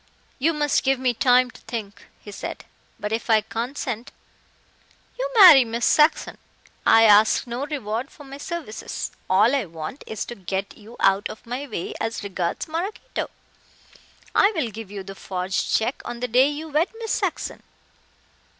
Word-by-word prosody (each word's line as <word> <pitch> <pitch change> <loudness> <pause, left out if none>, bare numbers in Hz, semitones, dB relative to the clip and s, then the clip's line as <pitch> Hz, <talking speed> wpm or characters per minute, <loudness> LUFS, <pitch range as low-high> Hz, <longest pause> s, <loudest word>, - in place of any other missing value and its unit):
"You 310 +5 +3
must 295 -1 +1
give 270 0 +2
me 255 -1 +1
time 250 +1 +4
to - - -16
think," 205 -4 -7
he 205 - -11
said, - - -7 0.3
"but 210 - -4
if 225 +2 -3
I 220 -1 +5
consent 235 +2 -4 0.5
" - - -34
"You - - -1
marry 355 - +10
Miss 230 0 -2
Saxon. 305 +1 +3 0.5
I 225 0 +7
ask 215 0 +5
no 245 +4 -4
reward 245 -4 -3
for 320 -6 -14
my 275 0 -10
services. 335 - -5 0.2
All 210 +7 +4
I 270 -6 0
want 165 - -8
is 220 - -4
to - - -7
get 195 -1 -4
you 225 +3 -14
out 195 +1 +3
of 220 - -10
my 250 +5 -5
way 210 -8 -5
as 225 -1 -3
regards 185 -4 -3
Maraquito. 345 +7 -4 1.0
I 400 - +5
will 265 -9 -1
give 220 -1 -8
you 200 -1 -7
the 195 - -8
forged 185 -1 -2
check 225 +4 -2
on 240 - -6
the 250 - -2
day 250 +3 +4
you 305 +2 -6
wed 310 +4 +2
Miss 450 -1 -4
Saxon. - - -2
235 Hz, 170 wpm, -23 LUFS, 210-285 Hz, 1.0 s, marry